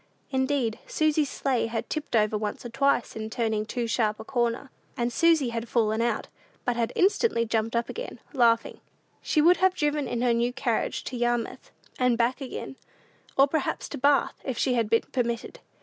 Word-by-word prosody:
Indeed, 265 -4 0
Susy's 310 -2 +1
sleigh 255 -4 0
had 225 0 -3
tipped 305 -5 -3
over 215 -1 +3
once 210 +2 -3
or - - -4
twice 275 +1 +1
in 220 0 -4
turning 220 -2 -1
too 240 0 -2
sharp 215 -2 0
a - - -6
corner, 240 +2 -1 0.3
and 240 0 -1
Susy 325 -6 +4
had 230 0 -4
fallen 220 -2 +1
out, 235 0 0 0.4
but 245 - +1
had 235 -1 0
instantly 385 - +2
jumped 225 0 -1
up 235 0 +1
again, - - -6
laughing. 230 -4 +2 0.4
She 305 - +2
would 355 +3 +6
have 375 0 +3
driven 295 -2 0
in 240 0 -2
her 245 -1 +3
new 240 +1 +1
carriage 235 -3 -1
to 255 - -6
Yarmouth 240 -1 -1 0.3
and 250 -2 +3
back 245 +4 +1
again, 265 0 -6 0.6
or 275 +1 +6
perhaps 300 0 -2
to - - -6
Bath, 285 +1 +3
if 260 -3 -3
she 260 - +1
had 230 -3 +1
been 230 - +3
permitted. 240 - -2
240 Hz, 185 wpm, -27 LUFS, 230-275 Hz, 0.6 s, would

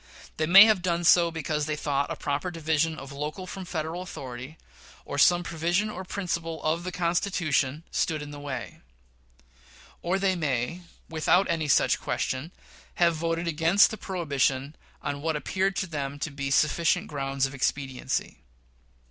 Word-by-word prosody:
They 155 - 0
may 195 +5 +10
have 215 -4 +3
done 175 -1 0
so 170 0 +6
because 155 -2 -2
they 155 - -1
thought 140 -1 -1
a - - -3
proper 145 +5 -2
division 160 -1 0
of 135 -1 -9
local 150 +6 -5
from 185 0 -7
Federal 165 0 -4
authority, 135 -4 -8 0.5
or 140 - -4
some 175 +4 +5
provision 175 +5 0
or 190 -2 -6
principle 170 -4 -4
of 160 +2 0
the 185 - -4
Constitution, 170 -5 0
stood 155 -3 -1
in 145 - -8
the 145 - -8
way; 135 -4 -6 1.2
or 180 +3 0
they 195 -1 +1
may, 150 +1 -2 0.3
without 165 +4 +2
any 160 -2 -1
such 140 - +3
question, 130 +6 -2 0.4
have 170 -1 +4
voted 165 +1 -2
against 165 +5 +4
the - - -4
prohibition 145 -7 -1 0.3
on 145 -1 -3
what 160 +1 -1
appeared 190 +5 -1
to 190 - -1
them 145 -5 -4
to 145 +1 -4
be 140 0 -4
sufficient 165 +5 +2
grounds 135 -4 -1
of 135 - -5
expediency. 135 - -2
160 Hz, 160 wpm, -27 LUFS, 145-175 Hz, 1.2 s, may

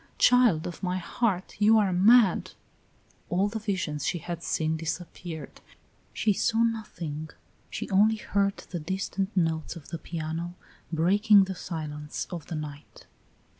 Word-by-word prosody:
Child 240 -10 +5
of 175 -1 -6
my 180 -1 -1
heart, 185 +1 -1
you 220 +2 +6
are 200 -4 +3
mad!" 205 +2 +5 0.8
All 185 +3 +2
the 220 +2 -4
visions 185 -9 -2
she - - 0
had 170 0 -6
seen 160 -1 0
disappeared; 165 -1 -6 0.5
she 210 - +1
saw 225 +3 +2
nothing, 170 -9 -3 0.4
she - - -5
only 210 +3 +5
heard 200 -2 0
the 175 - -6
distant 190 +4 -3
notes 160 -2 0
of 160 -4 -11
the 165 - -5
piano 165 +2 -4 0.4
breaking 200 +5 +5
the 190 0 -3
silence 150 -4 -5
of 170 -4 -6
the 170 - -4
night. 150 -1 -8
180 Hz, 140 wpm, -27 LUFS, 160-205 Hz, 0.8 s, you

